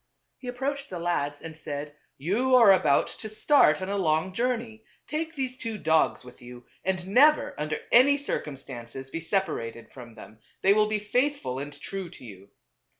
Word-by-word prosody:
He 255 - -10
approached 275 +3 -3
the 185 - -5
lads 145 -4 -2
and 165 -1 -8
said, 145 -1 -6
" - - -48
You 255 +7 +3
are 230 -6 +8
about 150 -7 +3
to 220 - -7
start 215 - +3
on 185 - -4
a 200 0 -1
long 160 +1 +1
journey; 230 -1 -2 0.2
take 320 +1 -4
these 260 -2 -3
two 225 -2 -4
dogs 160 -6 +1
with 125 0 -14
you, 120 0 -12 0.2
and 185 -1 -2
never, 290 +10 +4
under 150 +1 -3
any 275 +4 +6
circumstances, 135 - -6
be 165 - -4
separated 115 - -2
from 120 -3 -12
them; 110 +3 -13 0.2
they 195 - +6
will 210 0 +3
be 215 0 0
faithful 210 - -1
and 145 +1 -7
true 190 +2 -6
to 160 - -13
you." 100 -3 -12
185 Hz, 180 wpm, -27 LUFS, 145-240 Hz, 0.2 s, are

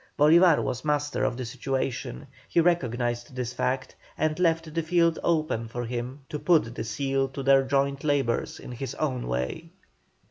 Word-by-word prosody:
Bolívar 165 +2 +6
was 125 -3 -3
master 145 -1 0
of 120 - 0
the 130 - -4
situation, 135 +3 -3 0.2
he - - +2
recognised 120 -7 0
this 125 -1 -3
fact, 130 +1 -2 0.2
and 155 +1 0
left 165 -2 +1
the 165 - 0
field 170 0 +2
open 155 -9 0
for 120 +2 -4
him 125 +4 -5
to 150 - -4
put 155 -10 +3
the 110 - -4
seal 135 +4 -1
to 135 +1 -6
their 135 0 +6
joint 140 +1 0
labours 140 -5 0
in - - -9
his 125 +1 -5
own 130 -5 -2
way. 65 - -3
135 Hz, 170 wpm, -27 LUFS, 120-155 Hz, 0.2 s, Bolívar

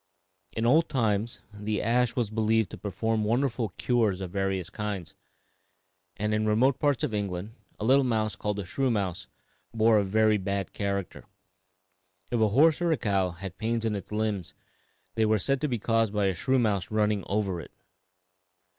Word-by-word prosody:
In 115 - -1
old 155 +7 +4
times 115 -3 0
the 105 +1 -2
ash 120 +1 +1
was 115 -4 -1
believed 110 -1 +1
to - - -7
perform 110 +2 -1
wonderful 120 0 0
cures 110 -7 +1
of 95 -2 -5
various 95 -2 -2
kinds, 100 -6 -4 1.0
and 105 +1 -1
in 110 0 +1
remote 125 +5 +3
parts 145 -1 +1
of 140 -7 -1
England 100 0 -3 0.3
a 105 - -2
little 135 +3 +5
mouse 110 -4 0
called 105 -1 -3
the 100 - -4
shrew 135 +9 0
mouse 100 -4 -2 0.5
bore 110 -1 +5
a - - +1
very 110 +2 +3
bad 100 -1 -3
character. 100 -3 -3 1.1
If 120 -2 +1
a 110 - +5
horse 150 +10 +4
or 165 -3 +2
cow 95 -5 +1
had 90 +1 -8
pains 115 +1 -1
in 110 -2 0
its 100 -1 -7
limbs, 105 -4 -2 0.6
they 110 - +1
were 110 0 +3
said 135 +6 0
to 150 - +1
be 125 -4 -1
caused 115 -1 +1
by 105 -1 +2
a 95 - +2
shrew 130 +10 +1
mouse 105 -7 +1
running 105 -2 +1
over 100 -3 -1
it. - - -12
110 Hz, 175 wpm, -28 LUFS, 100-115 Hz, 1.1 s, little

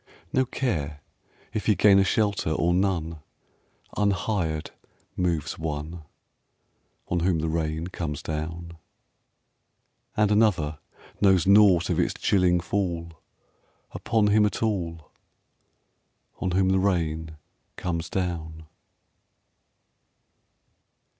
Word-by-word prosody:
No 130 0 +3
care 80 - -3 0.5
if 110 - -3
he 105 - +4
gain 100 -1 +6
a - - +5
shelter 100 -2 0
or 85 +2 +1
none, 85 -4 0 0.8
Unhired 100 -6 -1 0.4
moves 85 -5 -1
one, 80 +1 -4 1.1
On 90 - 0
whom 85 0 +1
the 80 +1 -2
rain 80 0 -2
comes 85 -5 -5
down. 80 +2 -5 1.4
And 105 -1 +3
another 90 -9 +2 0.4
knows 95 -4 +4
nought 100 -3 +5
of - - 0
its - - 0
chilling 90 -2 +2
fall 85 -2 -2 0.8
Upon 110 -2 +1
him 105 +1 +4
at 105 +2 0
all, 85 -8 -3 1.3
On 95 - -1
whom 95 +1 +2
the 95 0 +3
rain 80 -5 -1 0.4
comes 85 -2 -3
down. 80 -4 -4
85 Hz, 100 wpm, -26 LUFS, 80-100 Hz, 1.4 s, gain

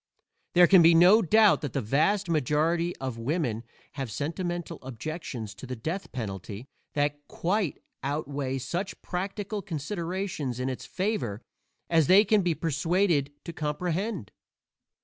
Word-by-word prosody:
There 175 0 +8
can 185 0 +7
be 165 0 +7
no 185 +7 +7
doubt 215 +3 +5
that 145 - -4
the - - 0
vast 155 - +1
majority 165 +3 +1
of 130 -3 -5
women 120 -3 -1 0.3
have 135 -4 -5
sentimental 170 - -3
objections 130 - -6
to 110 +5 -10
the 130 - -4
death 165 - -4
penalty 105 -1 -6 0.3
that 145 0 0
quite 185 -3 -1 0.2
outweigh 140 -1 -2
such 170 +10 -4
practical 200 +3 -3
considerations 170 - -3
in 130 +1 -1
its 130 - -6
favor 145 - -2 0.4
as 160 -4 +3
they 200 +3 +7
can 210 0 +4
be 175 -3 +1
persuaded 165 -1 +1
to 170 - -6
comprehend. 165 - -2
160 Hz, 135 wpm, -28 LUFS, 135-180 Hz, 0.4 s, There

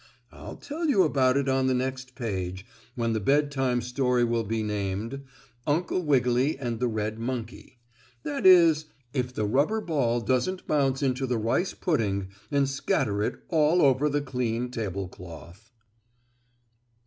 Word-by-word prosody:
I'll - - -9
tell 320 +3 -4
you 200 -9 +5
about 135 -4 +2
it 140 -1 0
on 130 0 +2
the 130 - +2
next 130 0 -3
page, 95 -6 -4 0.3
when 115 -2 0
the 110 - 0
Bedtime 135 0 +1
Story 125 0 +1
will 115 -1 +1
be 110 +1 -2
named 105 +5 -3 0.5
"Uncle 170 +5 0
Wiggily 130 -2 +2
and 120 -4 -3
the 125 - +1
Red 110 -1 -3
Monkey;" 120 0 -5 0.5
that 145 -1 -3
is, 170 -4 +6 0.3
if 125 -2 -1
the 110 -4 -2
rubber 140 - +2
ball 135 - 0
doesn't 130 - -1
bounce 135 -2 +1
into 130 0 0
the 125 -1 0
rice 115 - 0
pudding 100 - -1 0.2
and 140 -2 +2
scatter 110 -6 0
it - - -2
all 160 +1 +3
over 140 +2 +3
the 145 0 0
clean 125 -3 -2
tablecloth. 95 - -7
125 Hz, 150 wpm, -27 LUFS, 115-145 Hz, 0.5 s, is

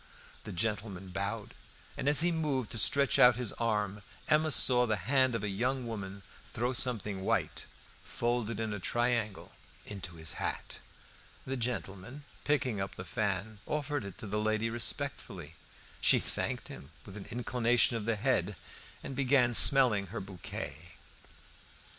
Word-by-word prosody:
The - - -6
gentleman 100 -1 -3
bowed, 100 +4 -4 0.4
and 140 - 0
as 145 +1 +5
he 175 +1 +2
moved 145 -8 -1
to 115 - -2
stretch 140 +2 +3
out 125 -1 +7
his 120 -3 -4
arm, 105 -3 -1 0.3
Emma 155 +1 +3
saw 125 -3 +4
the 110 - +1
hand 130 +5 +1
of 110 - -3
a - - -1
young 125 +6 -1
woman 100 -3 -6 0.3
throw 120 +3 -1
something 105 -6 0
white, - - -1 0.4
folded 120 -2 -2
in 110 -2 -2
a 105 - -4
triangle, 120 -1 -1 0.3
into 95 -4 -7
his 80 -1 -3
hat. - - -4 0.7
The 135 - -3
gentleman, 120 +1 -5 0.2
picking 130 -8 0
up 95 - -5
the 90 - -8
fan, 105 0 -3
offered 150 -1 -2
it 100 -2 -8
to - - -7
the 105 +1 -2
lady 110 +1 0
respectfully; 115 - -3 0.5
she - - +6
thanked - - -3
him 70 - -10 0.2
with 100 - -11
an 100 - -8
inclination 120 0 +2
of 110 -2 -3
the 115 0 +1
head, 105 -4 0 0.5
and 135 - -6
began 130 -2 +3
smelling 120 -6 +8
her - - -6
bouquet. 90 -3 -8
115 Hz, 155 wpm, -31 LUFS, 100-125 Hz, 0.7 s, smelling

